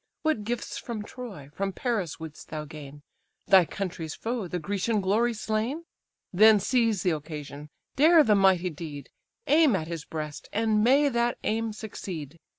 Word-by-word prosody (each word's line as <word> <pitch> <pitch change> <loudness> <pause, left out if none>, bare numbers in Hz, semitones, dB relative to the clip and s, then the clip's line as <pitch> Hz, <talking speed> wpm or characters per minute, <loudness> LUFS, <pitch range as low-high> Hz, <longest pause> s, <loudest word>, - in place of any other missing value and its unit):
What 315 -9 +1
gifts 235 +2 -4
from 225 -3 -5
Troy, 210 - -9
from 195 +2 -2
Paris 210 - -2
wouldst 160 -2 -9
thou 155 -1 -5
gain, 145 -1 -11 0.4
Thy 190 -2 +6
country's 170 -4 -5
foe, 230 -4 -3
the 180 - -3
Grecian 205 +5 -1
glory 210 +5 +2
slain? 220 +9 -2 0.5
Then 215 +3 +7
seize 230 -2 +1
the 180 - +2
occasion, 150 -1 -6 0.3
dare 315 +3 +7
the 220 - +4
mighty 190 -3 +3
deed, 150 -2 -8 0.3
Aim 300 -6 +5
at 160 - -2
his 165 -2 -5
breast, 150 -2 -6
and 215 -1 +2
may 275 +5 +5
that 235 -1 0
aim 225 +1 -1
succeed! 175 -8 -7
200 Hz, 155 wpm, -27 LUFS, 160-230 Hz, 0.5 s, Then